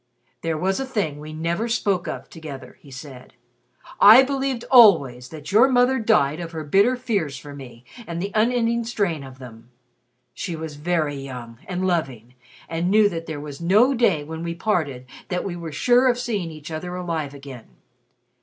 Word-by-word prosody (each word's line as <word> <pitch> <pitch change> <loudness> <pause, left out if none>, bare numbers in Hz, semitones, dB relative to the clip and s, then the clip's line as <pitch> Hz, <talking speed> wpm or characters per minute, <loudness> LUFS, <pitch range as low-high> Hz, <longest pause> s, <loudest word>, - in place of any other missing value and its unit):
"There 165 -1 -2
was 190 +4 0
a 270 - -2
thing 195 - -2
we 155 +1 -9
never 170 +8 -2
spoke 200 -6 0
of - - -6
together," 150 -5 -10
he 145 - -16
said. 135 -1 -11 0.7
"I 225 +6 +9
believed 270 -2 -2
always 140 - +6
that 155 0 -9
your 225 +6 +6
mother 255 0 +3
died 170 -10 +2
of 170 -1 -7
her 160 -1 -5
bitter 200 - +3
fears 200 - -2
for 145 +2 -10
me 125 -3 -12 0.2
and 170 0 -4
the 200 +3 -3
unending 235 +1 +1
strain 200 -10 -2
of 130 -1 -11
them. 120 -3 -13 0.6
She 170 +7 -5
was 160 -2 -7
very 155 -2 -1
young 125 -4 -8
and 185 0 -2
loving, 135 -10 -2 0.3
and 165 +2 -2
knew 210 +1 +5
that 165 -3 -6
there 155 -2 -5
was 145 +1 -9
no 210 +10 +4
day 205 - +2
when 160 +2 -7
we 170 0 -4
parted 155 - -1 0.2
that 180 -1 -2
we 185 -3 -4
were 170 -2 -7
sure 245 - +3
of 245 -1 +2
seeing 215 -8 -3
each 155 0 -10
other 180 +3 -5
alive 165 -5 -4
again. 135 -4 -11
170 Hz, 180 wpm, -23 LUFS, 145-215 Hz, 0.7 s, I